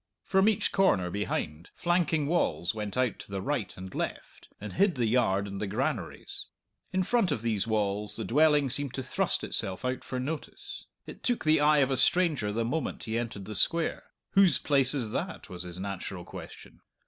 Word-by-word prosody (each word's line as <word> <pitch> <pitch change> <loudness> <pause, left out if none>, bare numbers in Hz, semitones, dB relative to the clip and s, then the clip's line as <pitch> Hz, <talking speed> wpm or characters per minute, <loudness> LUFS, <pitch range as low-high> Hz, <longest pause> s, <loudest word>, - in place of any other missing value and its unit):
From 190 +2 +4
each 215 - +1
corner, 95 - +2
behind, 85 -5 -3
flanking 170 -3 +1
walls 140 - +1
went 105 0 -4
out 125 -4 +1
to - - -9
the 100 0 -3
right 105 -3 -2
and 95 0 -8
left, - - -5
and 105 +1 -7
hid 195 -1 +3
the 120 -3 +1
yard 110 -4 +2
and 100 0 -6
the 105 - -1
granaries. 110 - -3 0.4
In 185 0 +1
front 225 -3 +2
of 120 -6 -2
these 110 -2 0
walls 105 -1 -1
the 115 - -3
dwelling 150 0 +4
seemed 140 -1 0
to 130 - -3
thrust 130 - 0
itself 95 +6 -2
out 130 0 -2
for 130 - -4
notice. 145 +5 -6 0.2
It - - -10
took 245 -7 -1
the 155 0 +5
eye 150 +1 +5
of 135 - -5
a 135 - +1
stranger 155 - +2
the 115 +2 -1
moment 145 +4 -2
he 110 -1 -3
entered 115 -4 -3
the 110 - -6
Square. 165 - +1 0.3
"Whose 195 -5 +5
place 140 -2 +4
is 120 -6 -1
that?" - - -4
was 90 -1 -6
his 90 -1 -6
natural 95 -2 -5
question. - - -11
125 Hz, 195 wpm, -29 LUFS, 100-155 Hz, 0.4 s, the